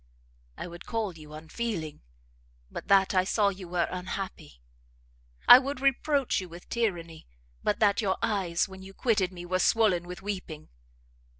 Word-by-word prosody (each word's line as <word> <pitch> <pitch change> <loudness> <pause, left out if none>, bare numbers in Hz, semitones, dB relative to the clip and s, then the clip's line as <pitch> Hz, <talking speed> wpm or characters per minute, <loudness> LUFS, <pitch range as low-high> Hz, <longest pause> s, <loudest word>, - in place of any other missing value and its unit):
I - - -5
would 175 0 -10
call 220 -5 -2
you 150 -1 -11
unfeeling, 160 0 -5 0.7
but - - -7
that 195 -1 +4
I 185 -1 +4
saw 200 +2 +2
you 190 -2 -8
were 175 0 0
unhappy; 180 - -6 0.9
I 245 - +12
would 275 0 -4
reproach 275 -2 +1
you 185 - -8
with 170 +1 -12
tyranny, 170 -9 -2 0.4
but 210 - +1
that 205 0 +4
your 190 -3 0
eyes 185 -5 0
when 190 0 -11
you 195 0 -12
quitted 210 -7 +1
me 175 -1 -9
were 185 +1 0
swollen 185 -6 +3
with 180 +1 -8
weeping! 185 -6 -6
190 Hz, 160 wpm, -28 LUFS, 175-215 Hz, 0.9 s, I